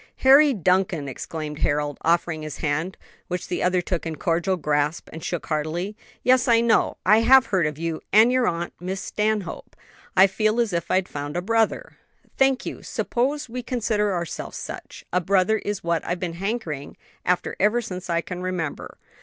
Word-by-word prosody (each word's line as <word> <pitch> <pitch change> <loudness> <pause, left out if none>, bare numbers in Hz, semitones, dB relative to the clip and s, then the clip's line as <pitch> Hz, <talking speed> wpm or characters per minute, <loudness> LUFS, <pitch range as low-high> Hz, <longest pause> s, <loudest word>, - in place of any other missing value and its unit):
"Harry 280 +2 +8
Duncan!" 185 - +1
exclaimed 150 +3 -6
Harold, 145 0 0
offering 170 -1 +1
his 155 -1 -6
hand, 160 +5 -2 0.3
which 180 -1 -4
the 175 - -2
other 180 0 +2
took 175 -1 -2
in 165 -1 -4
a - - -18
cordial 175 +4 0
grasp 150 0 0
and 160 - -8
shook 175 - -3
heartily, 165 +6 -2 0.3
"yes, 255 0 +4
I 230 -1 +5
know; 235 -1 +2
I 215 +3 +6
have 260 +3 +6
heard 185 -6 +1
of 150 -1 -5
you 165 0 -3
and 220 +4 +6
your 255 -1 +2
aunt, 170 +1 -2
Miss 185 +2 -4
Stanhope. 210 -2 -2 0.4
I 190 - +9
feel 215 +3 +1
as 230 -5 +1
if 170 0 -2
I'd 185 0 +2
found 145 +2 -5
a - - 0
brother." 225 +2 0 0.4
"Thank 270 -1 +2
you; - - -6
suppose 280 +5 -1
we 250 +2 -5
consider 220 -4 0
ourselves 170 -3 -4
such; - - -8
a 180 - +3
brother 195 +4 +2
is 205 -1 -4
what 170 -1 0
I've 175 +1 -3
been 175 -2 -3
hankering 195 - -4 0.3
after 180 0 0
ever 210 +5 +3
since 185 -6 -6
I 170 0 +1
can 180 +1 -6
remember." 180 -5 -4
185 Hz, 185 wpm, -24 LUFS, 165-220 Hz, 0.4 s, I